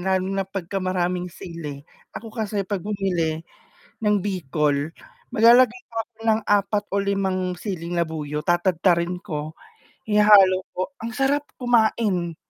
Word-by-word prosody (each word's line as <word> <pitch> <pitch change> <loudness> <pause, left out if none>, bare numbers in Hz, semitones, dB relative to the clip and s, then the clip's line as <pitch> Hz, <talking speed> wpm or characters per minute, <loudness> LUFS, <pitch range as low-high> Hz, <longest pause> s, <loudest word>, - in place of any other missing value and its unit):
lalo 190 0 +1
na 195 -1 -2
pag-ka-maraming 180 -1 -2
sili, 155 -5 -8 0.3
ako 225 0 -8
kasi 210 -3 -2
'pag 195 0 -3
bumili, 175 -5 -2 0.6
ng 210 -1 +3
bikol 155 -6 -1 0.4
maglalagay 240 +2 +5
ako 225 - -5 0.3
ng 220 0 +2
4 205 0 +2
o 200 - +2
5 190 -2 -1
siling 175 -4 -4
labuyo, 155 -3 -2
tatadtarin 175 0 +2
ko, 155 -5 -5 0.5
ihahalo 210 -3 +6 0.2
ko, 185 +9 -2
ang 230 - -4
sarap 275 +2 +2 0.2
kumain. 220 -8 +1
185 Hz, 120 wpm, -23 LUFS, 170-210 Hz, 0.6 s, ihahalo